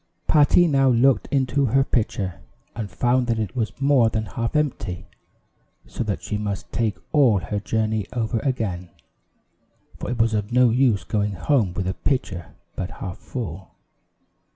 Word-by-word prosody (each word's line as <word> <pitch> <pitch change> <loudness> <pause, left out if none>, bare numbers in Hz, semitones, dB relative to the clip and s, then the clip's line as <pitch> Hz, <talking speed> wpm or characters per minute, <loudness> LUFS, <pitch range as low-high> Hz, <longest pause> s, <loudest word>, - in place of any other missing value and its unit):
Patty 155 +3 +5
now 135 -3 +3
looked 125 +2 +3
into 140 0 +1
her 135 +4 +3
pitcher 100 - -1 0.4
and 110 -3 -4
found 125 +2 +1
that 115 -1 +1
it 110 -2 -3
was 115 0 -3
more 135 -4 +4
than 110 -1 -2
half 115 +5 -4
empty, 115 - -1 0.8
so - - -4
that 105 -3 -3
she 105 - -3
must 100 -2 -4
take 115 -3 -1
all 135 -9 +5
her 100 +2 -3
journey 110 -1 -1
over 115 -1 -1
again; 105 -10 -2 1.1
for - - -5
it 125 - -2
was 115 -1 +2
of 105 0 -2
no 125 -1 +5
use 120 -6 +2
going 105 +1 -1
home 110 - +1
with 95 -1 -2
a 95 - 0
pitcher 95 - -3 0.2
but 90 - -3
half 95 -1 -7
full. 95 - -7
115 Hz, 160 wpm, -23 LUFS, 100-130 Hz, 1.1 s, Patty